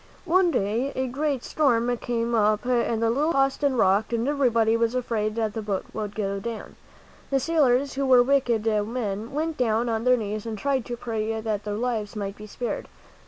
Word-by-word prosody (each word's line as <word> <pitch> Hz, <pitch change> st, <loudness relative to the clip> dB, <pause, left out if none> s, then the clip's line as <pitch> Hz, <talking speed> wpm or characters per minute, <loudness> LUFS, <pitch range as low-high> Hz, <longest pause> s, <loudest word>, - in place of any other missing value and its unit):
One 360 Hz, +1 st, +4 dB
day 235 Hz, +1 st, 0 dB
a 260 Hz, -, 0 dB
great 275 Hz, +1 st, -2 dB
storm 245 Hz, -5 st, +1 dB
came 235 Hz, 0 st, -2 dB
up 215 Hz, 0 st, +2 dB
and 235 Hz, -2 st, +1 dB
the 225 Hz, -, +3 dB
little 300 Hz, +7 st, +1 dB
ship -, -, -4 dB
tossed 270 Hz, +1 st, +2 dB
and 275 Hz, -3 st, +2 dB
rocked 200 Hz, +1 st, +3 dB
and 230 Hz, +2 st, 0 dB
everybody 235 Hz, -6 st, +2 dB
was 230 Hz, +1 st, +1 dB
afraid 220 Hz, -4 st, -1 dB
that 220 Hz, -2 st, -1 dB
the 220 Hz, -, -3 dB
boat 205 Hz, -3 st, -3 dB
would 210 Hz, -2 st, -4 dB
go 200 Hz, -2 st, -2 dB
down. 225 Hz, +1 st, -6 dB, 0.5 s
The 275 Hz, -, +2 dB
sailors, 280 Hz, -3 st, +2 dB
who 275 Hz, 0 st, -1 dB
were 250 Hz, -2 st, +7 dB
wicked 245 Hz, -4 st, +1 dB
men, 215 Hz, 0 st, -1 dB
went 315 Hz, +2 st, -2 dB
down 235 Hz, -1 st, +1 dB
on 225 Hz, 0 st, -1 dB
their 250 Hz, 0 st, +4 dB
knees 215 Hz, 0 st, -4 dB
and 220 Hz, -1 st, -4 dB
tried 270 Hz, +1 st, 0 dB
to 240 Hz, -, -5 dB
pray 225 Hz, -2 st, -2 dB
that 215 Hz, -2 st, -3 dB
their 205 Hz, -1 st, -2 dB
lives 225 Hz, -3 st, -2 dB
might 200 Hz, -1 st, -4 dB
be 210 Hz, 0 st, -10 dB
spared. 240 Hz, +3 st, -4 dB
230 Hz, 205 wpm, -25 LUFS, 215-260 Hz, 0.5 s, were